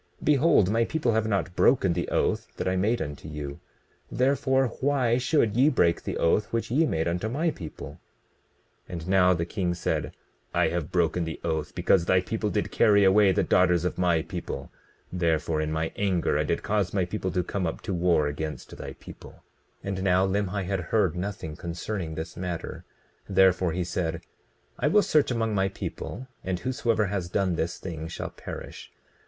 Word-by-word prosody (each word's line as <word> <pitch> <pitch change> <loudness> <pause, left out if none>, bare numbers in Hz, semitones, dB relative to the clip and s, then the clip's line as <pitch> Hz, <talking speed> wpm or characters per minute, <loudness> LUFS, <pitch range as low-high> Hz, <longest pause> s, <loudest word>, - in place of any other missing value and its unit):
Behold, 145 - +4
my 115 +1 +3
people 150 -1 0
have 110 0 +1
not 100 -4 -1
broken 100 -9 +4
the 85 0 -2
oath - - 0
that - - -2
I 95 - +1
made 105 +4 +1
unto 75 +1 -8
you; 75 -2 -6 0.5
therefore, 135 0 +2
why 130 -4 +2
should 125 -5 +2
ye 135 +5 +5
break 85 - +2
the - - -4
oath 100 +5 +1
which 115 -1 -2
ye 155 +5 +3
made 80 - 0
unto 90 +6 -1
my 155 +7 0
people? 80 - -9 0.9
20:15 - - -9
And 85 0 -5
now 90 -1 +5
the 85 0 -1
king 90 0 -2
said: 85 - -2 0.4
I - - +3
have 85 -3 -3
broken 85 -1 +1
the 80 -1 -5
oath 80 -3 -2
because 85 -3 +3
thy 95 +1 +4
people 105 +3 -2
did 105 0 -1
carry 105 -3 +4
away 100 +1 +5
the 90 - +2
daughters 90 -1 +3
of 90 - -2
my 85 -3 +2
people; - - -6 0.4
therefore, 80 -3 0
in 75 0 -2
my 80 +1 -1
anger 95 -4 +1
I - - +1
did - - -1
cause 100 -3 0
my 95 -2 +2
people 95 +1 -3
to 90 - +1
come 90 0 -2
up 80 - -4
to 95 - -3
war 85 -3 +2
against 75 0 -5
thy - - -7
people. - - -13 0.4
20:16 - - -8
And 95 -1 -2
now 95 0 +3
Limhi 100 0 -1
had 95 +1 -1
heard 90 -1 +1
nothing 90 -4 -4
concerning 85 +1 -4
this 80 +1 -6
matter; 90 -2 -5 0.4
therefore 95 -2 +4
he 90 +2 -1
said: 85 -1 -2 0.6
I - - +2
will 210 0 +5
search 150 -2 +3
among 115 -3 0
my 95 -1 +2
people 125 +5 -6 0.2
and 95 -1 -2
whosoever 115 -3 0
has 95 -3 -3
done 95 0 +1
this 85 0 -2
thing 80 -3 -6
shall 80 - -5
perish. - - -9
95 Hz, 190 wpm, -27 LUFS, 85-110 Hz, 0.9 s, ye